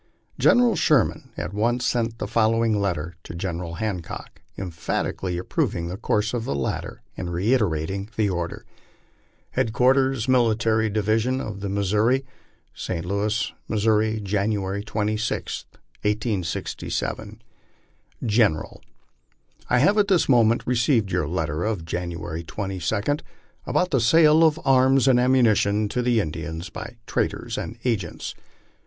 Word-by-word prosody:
General 245 -2 +5
Sherman 135 -9 +2
at - - -4
once 120 +4 0
sent 115 -2 0
the - - -3
following 115 0 +2
letter 85 -4 -2
to - - -8
General 85 -1 -4
Hancock, 95 -5 -5 0.2
emphatically 90 0 -3
approving 85 -1 -1
the 90 - -4
course 105 +1 0
of 120 -2 -1
the 70 - -2
latter, 70 - -3
and 90 0 -4
reiterating 95 -2 0
the 110 -2 +2
order: 85 -3 -3 0.9
HEADQUARTERS 130 +1 +2
MILITARY 115 -3 +2
DIVISION 110 +5 +1
OF 105 -5 -5
THE 100 0 -4
MISSOURI, 105 +7 +1 0.2
) - - -39
ST. 85 -2 -4
Louis, 105 +4 -1 0.2
MISSOURI, 110 0 +2
January 100 0 -1
26, 110 +1 -2 0.4
1867. 105 -4 -2 0.4
) - - -14
GENERAL: 105 -8 +1 0.9
I 125 - +4
have 205 - +4
this 190 -4 +3
moment 120 -3 +4
received 120 -4 +2
your 90 -4 0
letter 80 -1 -2
of 105 -7 -2
January 85 -1 -4
22, 100 - -2 0.5
about 180 0 +1
the 130 -5 +2
sale 155 +6 +6
of 160 -1 +4
arms 130 0 +4
anfl 125 -2 +5
ammunition 110 -5 +3
to 125 +3 -1
Indians 85 -7 -1
by - - -7
traders - - -2
and 115 - -5
agents. 100 -9 -2
110 Hz, 125 wpm, -24 LUFS, 90-120 Hz, 0.9 s, sale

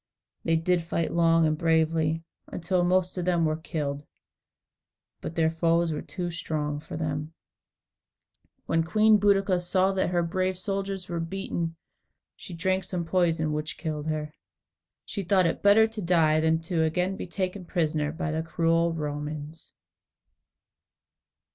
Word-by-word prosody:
They 165 - +2
did 170 +2 +1
fight 165 0 -2
long 165 -1 +4
and 155 0 +2
bravely, 160 0 +1 0.2
until 180 +1 -1
most 185 +1 +1
of 175 - -2
them 175 -2 +2
were 155 0 +1
killed, 150 -3 -4 1.2
but 160 - -6
their 160 -1 +2
foes 165 0 +1
were 150 - -3
too 175 -2 -5
strong 150 -3 -3
for 155 - -8
them. 155 0 -3 1.3
When 165 - +1
Queen 215 +5 +4
Boadicea 195 -2 +3
saw 185 +2 +2
that 190 -1 0
her 175 -1 +1
brave 185 +2 -1
soldiers 195 -1 -3
were 170 -1 -3
beaten, 165 -1 -3 0.6
she 175 - -9
drank 185 +2 0
some 180 -2 -3
poison 165 -3 +1
which 150 +1 -3
killed 155 -2 -4
her. 155 -1 -3 0.7
She 200 - -4
thought 185 0 +3
it 165 - -1
better 205 +2 +6
to 220 -1 -6
die 165 -3 +3
than 160 +1 +2
to 170 +1 -3
be - - +3
again 180 +4 0
taken 185 +1 -3
prisoner 155 -4 -1
by 165 0 -3
the 160 +1 -1
cruel 165 0 +1
Romans. 150 0 -5
165 Hz, 150 wpm, -27 LUFS, 160-185 Hz, 1.3 s, better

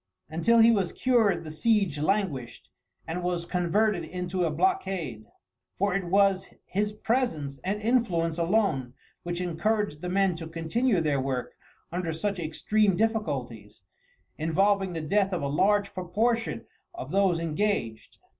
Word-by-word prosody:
Until 200 +9 +3
he 230 +1 +7
was 195 -6 0
cured 220 -9 +2
the 155 - -7
siege 195 -2 +1
languished, 155 - -2 0.4
and 165 +2 -4
was 175 -1 -2
converted 180 +2 +1
into 180 +2 -3
a - - +1
blockade, 180 - -1 0.5
for 200 0 +1
it 195 -1 -1
was 195 +1 +2
his 205 +2 -1
presence 210 - -1
and 200 +3 -1
influence 185 -8 +1
alone 165 - +1 0.3
which 175 0 -4
encouraged 180 -1 -1
the 180 - -4
men 195 0 +2
to 165 -1 -7
continue 170 +6 0
their 145 -4 +1
work 130 -2 -3 0.4
under 175 -1 -2
such 195 +4 -2
extreme 195 +5 +1
difficulties, 130 - -2 0.6
involving 195 +4 +2
the 165 - -3
death 195 +5 +1
of 175 - -2
a - - 0
large 200 +7 +2
proportion 225 +6 -1 0.3
of 345 - -7
those 190 -3 +2
engaged. 160 - -2
180 Hz, 140 wpm, -27 LUFS, 160-210 Hz, 0.6 s, he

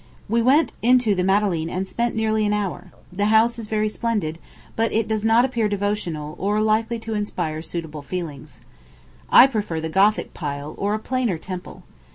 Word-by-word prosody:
We 230 +3 +1
went 275 +7 +4
into 245 -2 +4
the 180 -2 0
Madeleine 190 -4 +1
and 185 +2 -3
spent 235 +4 -1
nearly 220 -1 +1
an 205 - +1
hour. 205 -4 -3 0.2
The 200 +2 0
house 225 +2 +3
is 220 - -6
very 215 0 0
splendid; 210 -8 -2 0.4
but 225 0 +1
it 220 0 0
does 215 -1 -1
not 225 +2 +4
appear 235 -5 0
devotional, 195 -7 -2
or 205 +2 0
likely 220 +2 +1
to 225 0 -6
inspire 165 -7 -3
suitable 160 -3 -6
feelings. 155 -3 -7 0.7
I 245 - +9
prefer 210 -10 -2
the 160 0 -4
Gothic 200 +5 +2
pile, 145 -1 -5
or 205 +1 0
a - - -3
plainer 245 -5 -1
temple. 180 +2 -8
210 Hz, 180 wpm, -22 LUFS, 180-225 Hz, 0.7 s, I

